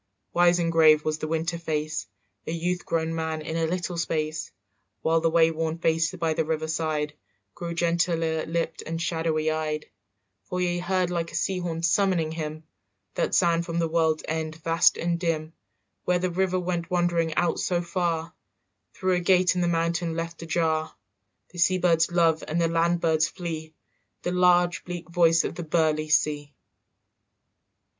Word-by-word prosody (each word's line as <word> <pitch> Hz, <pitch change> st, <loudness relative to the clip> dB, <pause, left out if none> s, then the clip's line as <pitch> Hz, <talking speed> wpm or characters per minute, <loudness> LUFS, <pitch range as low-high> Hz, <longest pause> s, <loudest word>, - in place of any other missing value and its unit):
Wise 175 Hz, 0 st, +4 dB
and 170 Hz, -1 st, 0 dB
grave 155 Hz, -2 st, +5 dB
was 155 Hz, 0 st, -1 dB
the 155 Hz, -, -3 dB
water 165 Hz, +1 st, -2 dB
face, 155 Hz, -6 st, -3 dB, 0.4 s
A -, -, -2 dB
youth 175 Hz, +2 st, -2 dB
grown 165 Hz, 0 st, 0 dB
man 160 Hz, -1 st, -3 dB
in 160 Hz, +1 st, -4 dB
a 165 Hz, -1 st, +1 dB
little 175 Hz, +1 st, -3 dB
space; 155 Hz, -1 st, -2 dB, 0.5 s
While 165 Hz, 0 st, +2 dB
the 165 Hz, -, +2 dB
wayworn 165 Hz, 0 st, +2 dB
face 165 Hz, 0 st, +1 dB
by 165 Hz, -2 st, 0 dB
the 160 Hz, 0 st, 0 dB
river 160 Hz, 0 st, -2 dB
side 155 Hz, -2 st, -1 dB, 0.4 s
Grew 170 Hz, -1 st, -5 dB
gentler 165 Hz, -1 st, +1 dB
lipped 165 Hz, 0 st, -2 dB
and 165 Hz, +1 st, -4 dB
shadowy 160 Hz, -2 st, 0 dB
eyed; 155 Hz, -1 st, -2 dB, 0.6 s
For 180 Hz, -, -4 dB
he 175 Hz, -1 st, 0 dB
heard 180 Hz, 0 st, 0 dB
like 170 Hz, -1 st, -2 dB
a -, -, -8 dB
sea 190 Hz, -1 st, 0 dB
horn 165 Hz, -2 st, -4 dB
summoning 170 Hz, -2 st, +2 dB
him 155 Hz, -1 st, -5 dB, 0.5 s
That -, -, 0 dB
sound 170 Hz, -2 st, +3 dB
from 170 Hz, 0 st, -4 dB
the 165 Hz, -1 st, +1 dB
world's 160 Hz, -1 st, +1 dB
end 160 Hz, 0 st, -3 dB
vast 165 Hz, 0 st, +4 dB
and 170 Hz, 0 st, -1 dB
dim, 160 Hz, -2 st, -2 dB, 0.5 s
Where 180 Hz, -, +2 dB
the 180 Hz, 0 st, -1 dB
river 185 Hz, +1 st, 0 dB
went 175 Hz, -1 st, -3 dB
wandering 170 Hz, -3 st, +1 dB
out 175 Hz, -2 st, +1 dB
so 175 Hz, -1 st, 0 dB
far 170 Hz, -1 st, -2 dB, 0.6 s
Through 185 Hz, 0 st, 0 dB
a -, -, +1 dB
gate 180 Hz, 0 st, +4 dB
in 180 Hz, -, -1 dB
the 175 Hz, -, +2 dB
mountain 170 Hz, 0 st, 0 dB
left 165 Hz, 0 st, -5 dB
ajar, 160 Hz, -3 st, -1 dB, 0.6 s
The 175 Hz, -, -9 dB
sea 185 Hz, +2 st, +4 dB
birds 170 Hz, -2 st, +2 dB
love 165 Hz, -2 st, +2 dB
and 160 Hz, +2 st, -1 dB
the 170 Hz, -, +3 dB
land 170 Hz, +1 st, +1 dB
birds 160 Hz, -1 st, +2 dB
flee, 160 Hz, -3 st, -6 dB, 0.5 s
The 175 Hz, -, -1 dB
large 180 Hz, -1 st, +3 dB
bleak 175 Hz, -1 st, -7 dB
voice 165 Hz, -1 st, +4 dB
of -, -, -3 dB
the 175 Hz, -, -6 dB
burly 155 Hz, -1 st, +1 dB
sea. 150 Hz, -2 st, +1 dB
165 Hz, 170 wpm, -26 LUFS, 160-175 Hz, 0.6 s, grave